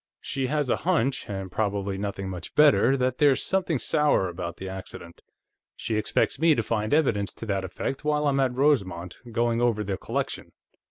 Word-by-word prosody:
She 135 -1 -3
has 145 -2 0
a - - +2
hunch, 140 - 0
and 95 -2 -5
probably 100 -2 -1
nothing 100 0 -4
much 90 -3 -7
better, 135 -3 +5
that 125 -1 -1
there's 145 -3 +4
something 185 -5 0
sour 150 - +2
about 85 -1 -6
the 95 - -7
accident. 95 -3 -9 0.5
She 115 - -3
expects 110 - 0
me 160 -1 +5
to 115 - 0
find 110 -1 -1
evidence 115 -10 +2
to - - -8
that 100 -3 -1
effect 115 +9 -4
while 150 0 +1
I'm 140 -1 +2
at 130 -2 +1
Rosemont, 95 - +1
going 120 +1 +1
over 115 -3 +1
the 95 -1 -3
collection. - - -4
115 Hz, 180 wpm, -26 LUFS, 95-140 Hz, 0.5 s, better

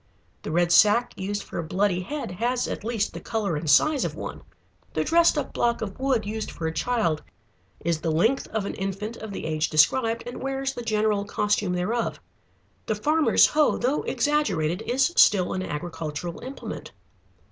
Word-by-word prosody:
The - - -6
red 175 +1 +2
sack 215 +7 +5
used 205 +2 -3
for - - -6
a - - -2
bloody 185 +2 0
head 285 +4 -5
has 240 +6 -1
at - - -5
least 220 -2 -1
the - - -6
color 210 -7 -2
and 150 +1 -3
size 285 - +4
of - - -3
one. - - -6 0.5
The - - +1
dressed 335 -1 +4
up 295 - -3
block 235 -1 0
of 200 +1 -7
wood 260 -5 +1
used 215 +1 -4
for 165 - -6
a 160 - -1
child 210 -9 0 0.6
is 165 -1 -1
the 165 - 0
length 220 +12 +2
of 220 -2 -3
an - - -3
infant 195 +3 -4
of 220 -1 -7
the - - -5
age 155 0 0
described 225 - +3
and 245 +1 -7
wears 270 0 -2
the 245 - -6
general 215 -2 +1
costume 205 -2 0
thereof. 215 +7 -1 0.7
The 215 - 0
farmer's 305 +8 +4
hoe, 300 -1 +2
though 260 +5 0
exaggerated, 195 - 0
is 265 +7 +2
still 185 -3 +5
an 185 - -2
agricultural 165 0 -5
implement. 265 +2 -8
210 Hz, 180 wpm, -25 LUFS, 175-245 Hz, 0.7 s, sack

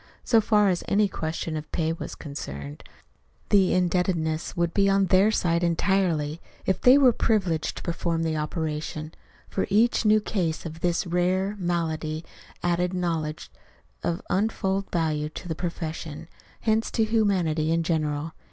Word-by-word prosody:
So 225 -2 +4
far 210 -1 +3
as 180 -2 0
any 205 +1 +3
question 160 -2 -4
of 155 0 -6
pay 160 -1 0
was 165 - -7
concerned, 70 - -7 0.7
the 195 -3 +4
indebtedness 175 -3 0
would 170 -1 +1
be 195 -1 +3
on 195 0 +3
their 190 +3 +4
side 170 -5 +1
entirely 170 -3 +1 0.2
if 190 - 0
they 255 +2 +7
were 260 -4 +6
privileged 190 -10 0
to - - -7
perform 165 -1 -1
the 160 -1 0
operation, 155 0 -3 0.3
for 190 - -2
each 225 +5 +3
new 215 0 +5
case 175 -7 -2
of 160 0 -7
this 175 0 +1
very 175 0 0
rare 190 +2 0
malady 165 -3 -2 0.4
added 175 +1 +1
knowledge 165 -4 -2 0.5
of 170 - -2
untold 195 0 0
value 155 -3 0
to 165 - -9
the 165 - -1
profession, 160 -2 -5 0.3
hence 220 0 +1
to 225 - +1
humanity 185 -8 +1
in 165 0 +2
general. 155 -1 -1
170 Hz, 150 wpm, -26 LUFS, 160-195 Hz, 0.7 s, they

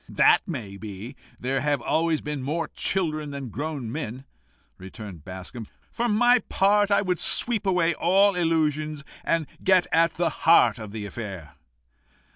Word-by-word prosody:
"That - - +5
may 115 - -6
be; 105 +5 -8 0.2
there 130 +1 -1
have 145 0 +1
always 160 +5 0
been 150 -2 -4
more 155 +6 -2
children 155 -5 -1
than 140 -3 -6
grown 140 -1 -4
men," 130 -2 -5 0.5
returned 95 -3 -10
Bascombe. 95 +6 -8 0.2
"For 240 +1 -1
my 245 +3 +4
part, 205 +1 +3
I 200 - +3
would 180 -3 -1
sweep 225 -4 +2
away 175 -3 +2
all 195 +6 +3
illusions, 155 -4 0 0.2
and 165 -2 0 0.2
get 185 -2 +4
at 165 0 +3
the 170 0 0
heart 125 -9 +4
of 110 -2 -8
the 105 -1 -6
affair." 100 -8 -7
150 Hz, 150 wpm, -25 LUFS, 115-175 Hz, 0.5 s, That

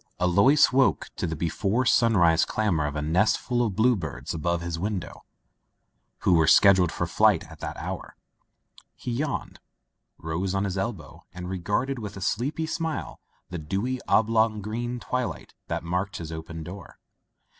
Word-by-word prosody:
Alois 100 +12 +5
woke 130 0 +2
to - - -2
the 80 - -3
before 95 - 0
sunrise 90 -10 +4
clamor 90 -9 0
of 75 - -5
a 75 - -2
nestful 110 +9 +1
of 105 -5 -2
bluebirds 110 - 0
above 85 +1 -1
his 85 -1 -4
window, 100 -1 -4 1.0
who - - +3
were 80 -2 +4
scheduled 95 -4 +6
for - - -2
flight - - +3
at - - -12
that - - -5
hour. - - -6 0.8
He 125 - -5
yawned, 140 +5 -3 0.6
rose 90 +4 -3
on 95 - +1
his 100 -2 -2
elbow, 100 -1 -4
and 90 0 -6
regarded 105 +9 -1
with 105 -2 -7
a - - -8
sleepy 130 - -1
smile 160 -1 -3 0.3
the 90 - -4
dewy 100 +11 -2
oblong 110 0 +3
of 105 - -6
green 120 +3 -3
twilight 125 +1 -4
that - - -3
marked 90 +4 -2
his 80 -1 -7
open 80 0 -7
door. 90 +2 -10
100 Hz, 155 wpm, -26 LUFS, 85-120 Hz, 1.0 s, scheduled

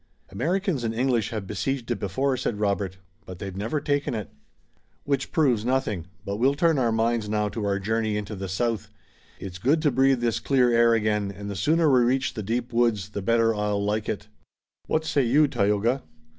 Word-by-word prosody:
"Americans 170 - -1
and 115 -1 -2
English 120 -3 +1
have 110 -4 -4
besieged 120 +5 -3
it 115 - -1
before," 130 +8 0
said 115 -4 -3
Robert, 100 -2 -1 0.3
"but 90 - -8
they've 95 0 -6
never 110 +10 -2
taken 145 -3 -1
it." 105 -3 -5 0.7
"Which 140 -1 -1
proves 130 - +2
nothing, 115 -9 -1 0.2
but 100 +1 -3
we'll 135 +5 +3
turn 165 -1 +2
our 120 -3 +2
minds 115 -1 0
now 105 0 0
to 110 +1 -5
our 100 -1 +1
journey 110 +1 -1
into 105 +1 -5
the 95 -1 -5
south. 115 +3 -1 0.5
It's 95 -1 -7
good 140 - +2
to 145 - +3
breathe 135 +1 +3
this 115 -2 0
clean 125 -3 +2
air 115 0 +5
again, 105 -2 0
and 100 +1 -7
the - - -5
sooner 155 - +2
we 130 -3 +5
reach 130 +2 +1
the 110 - -4
deep 115 +4 -3
woods 115 -5 +1
the 100 -1 -5
better 115 +2 +3
I'll 105 -1 -1
like 105 +1 -1
it. 100 0 -4 0.6
What 160 0 0
say 145 -2 +2
you, 145 +6 +4
Tayoga?" 115 +1 +1
115 Hz, 200 wpm, -25 LUFS, 105-130 Hz, 0.7 s, air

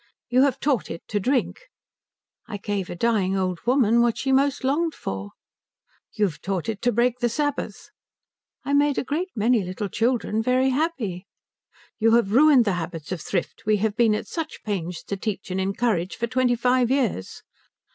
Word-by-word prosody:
"You 250 +1 +4
have 275 -1 +2
taught 265 - 0
it 165 - -7
to 210 - 0
drink." 265 - -1 0.8
"I 215 -3 -5
gave 200 -2 -3
a - - -5
dying 195 -2 +1
old 185 -2 -1
woman 235 -3 +4
what 235 -1 +2
she 270 - -1
most 275 +1 +2
longed 310 +5 0
for." 95 +1 -5 0.8
"You've 195 -8 -1
taught 190 -1 -3
it 220 -3 -3
to 245 - +2
break 240 +2 +1
the 240 - +1
Sabbath." 290 +5 -3 0.7
"I 280 - -1
made 285 0 +3
a - - 0
great 320 +8 -2
many 225 0 +2
little 185 +3 -4
children 225 0 0
very 255 +3 +2
happy." 255 - -2 0.7
"You 225 +1 +4
have 235 -4 +2
ruined 275 -2 +6
the 200 - +1
habits 165 0 -7
of 180 -4 -3
thrift 185 +2 -4
we 215 -1 +4
have 210 0 -1
been 225 -2 +3
at - - -4
such 325 -2 -6
pains 180 -5 -4
to 200 - -4
teach 195 -1 -4
and 190 +1 -1
encourage 195 -2 -1
for 235 - -1
twenty 250 0 +1
five 245 0 +2
years." 250 - -1
230 Hz, 180 wpm, -24 LUFS, 195-260 Hz, 0.8 s, ruined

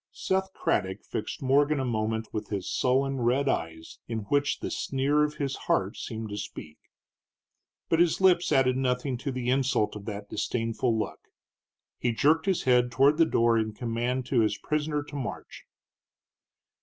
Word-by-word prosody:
Seth 190 0 -1
Craddock 95 0 -1
fixed - - -5
Morgan 145 +2 +3
a 130 - -1
moment 110 -1 -1
with 105 -1 -3
his 100 -3 -3
sullen 135 +2 +1
red 130 +4 +2
eyes, 80 -9 -3
in 115 -1 -3
which 145 0 +1
the - - -4
sneer 140 +2 +1
of 150 0 -1
his 140 -2 -2
heart 95 +1 +1
seemed 110 -1 -6
to 105 - -5
speak. 75 -6 -8 1.1
But 165 - +2
his 170 -2 +3
lips 180 -3 +4
added 130 -3 +3
nothing 130 0 0
to 140 +1 -3
the 125 -1 -1
insult 130 -6 +1
of 100 -1 -8
that 105 -2 -6
disdainful 115 0 -1
look. 110 - -5 0.7
He 120 -1 0
jerked 160 - +2
his 190 -3 +1
head 125 -1 +3
toward 140 +4 +4
the 165 - +6
door 115 -3 +3
in 110 -1 -2
command 120 +2 -2
to 130 -1 +1
his 105 -2 +2
prisoner 150 -1 -1
to 145 0 -11
march. 135 -4 -6
125 Hz, 170 wpm, -28 LUFS, 110-145 Hz, 1.1 s, the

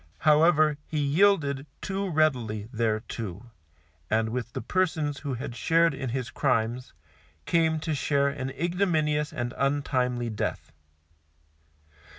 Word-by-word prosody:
However, 155 -1 +4
he 155 - -4
yielded 145 -2 +2
too 195 0 -3
readily 125 - +1
thereto, 110 -1 -3 0.6
and 110 0 +1
with 120 0 -4
the - - -3
persons 155 -1 0
who 140 -3 -3
had 120 0 -6
shared 165 +3 +3
in 135 -2 -4
his 125 0 -3
crimes, 125 -2 0 0.5
came 160 -1 +2
to 155 - -2
share 140 0 +1
an 135 -1 -3
ignominious 160 -3 0
and 120 0 -3
untimely 125 -4 0
death. 105 - -3
140 Hz, 120 wpm, -27 LUFS, 120-155 Hz, 0.6 s, However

